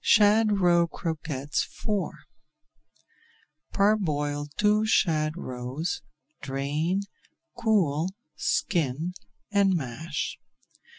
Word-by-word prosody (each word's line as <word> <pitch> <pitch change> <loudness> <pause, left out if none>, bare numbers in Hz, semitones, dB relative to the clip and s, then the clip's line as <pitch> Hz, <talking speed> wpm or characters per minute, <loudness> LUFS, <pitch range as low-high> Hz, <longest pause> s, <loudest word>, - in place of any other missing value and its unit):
SHAD 210 -1 +5
ROE 175 -2 +4
CROQUETTES 150 -4 -3 0.2
IV 210 -3 +1 1.6
Parboil 150 -8 +1
two 210 +1 +4
shad 155 -7 +2
roes, 130 +3 -4 0.4
drain, 150 +8 -1 0.5
cool, 185 -9 +2 0.3
skin, 160 0 0 0.4
and 200 -2 +4
mash. 150 +1 -3
165 Hz, 70 wpm, -27 LUFS, 145-200 Hz, 1.6 s, SHAD